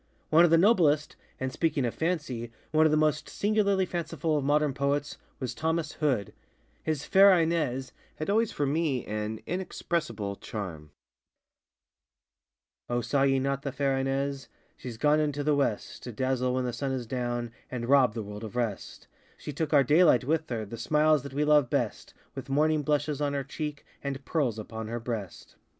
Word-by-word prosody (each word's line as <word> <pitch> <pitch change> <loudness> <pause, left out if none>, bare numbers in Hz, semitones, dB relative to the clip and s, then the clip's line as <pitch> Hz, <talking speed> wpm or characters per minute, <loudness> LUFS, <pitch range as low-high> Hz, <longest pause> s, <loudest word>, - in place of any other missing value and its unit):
One 160 +2 +7
of 175 - +5
the 165 - +6
noblestŌĆöand, 155 - +1
speaking 150 -2 0
of 120 - -2
FancyŌĆöone 150 -9 -2 0.3
of - - +5
the 155 - +3
most 155 -1 +1
singularly 200 -2 +1
fanciful 165 -2 -2
of 145 - 0
modern 145 0 +2
poets, 140 +1 -1 0.2
was 130 -3 -3
Thomas 160 -1 -1
Hood. 130 - -1 0.5
His 155 -3 -2
ŌĆ£Fair 190 -2 +6
InesŌĆØ 135 -6 -1 0.2
had 155 - -5
always 220 +2 +2
for 145 - -1
me 140 -3 0
an 105 +1 -4
inexpressible 135 - -3
charm:ŌĆö 85 -8 -7 2.0
O 120 - +1
saw 135 +4 0
ye 135 0 +3
not 135 +1 -1
fair 140 -1 +1
Ines? 135 +1 -2 0.3
SheŌĆÖs 120 -3 -7
gone 150 +3 +4
into 145 -1 -1
the 150 +1 +2
West, 135 -7 -1
To 125 - -7
dazzle 130 +1 0
when 130 0 0
the 125 - -2
sun 135 +1 -2
is 125 -2 -3
down, 120 -1 -3 0.2
And 120 -2 -4
rob 130 -5 +4
the 110 - -3
world 105 +1 -8
of 110 +1 -7
rest; 115 -5 -3 0.3
She 150 - -7
took 155 +3 -2
our 145 -3 +6
daylight 150 -1 +5
with 160 +4 0
her, 115 -3 -3
The 115 +3 -8
smiles 155 -1 +3
that 140 0 -9
we 150 +1 +1
love 150 -4 +4
best, - - -2 0.2
With - - -8
morning 155 +2 +2
blushes 145 0 0
on 145 -1 0
her 140 -1 -1
cheek, 150 +1 -6 0.2
And 140 -1 -4
pearls 135 -9 0
upon 110 0 -6
her 120 +2 -3
breast. 115 -6 -6
140 Hz, 175 wpm, -28 LUFS, 120-155 Hz, 2.0 s, One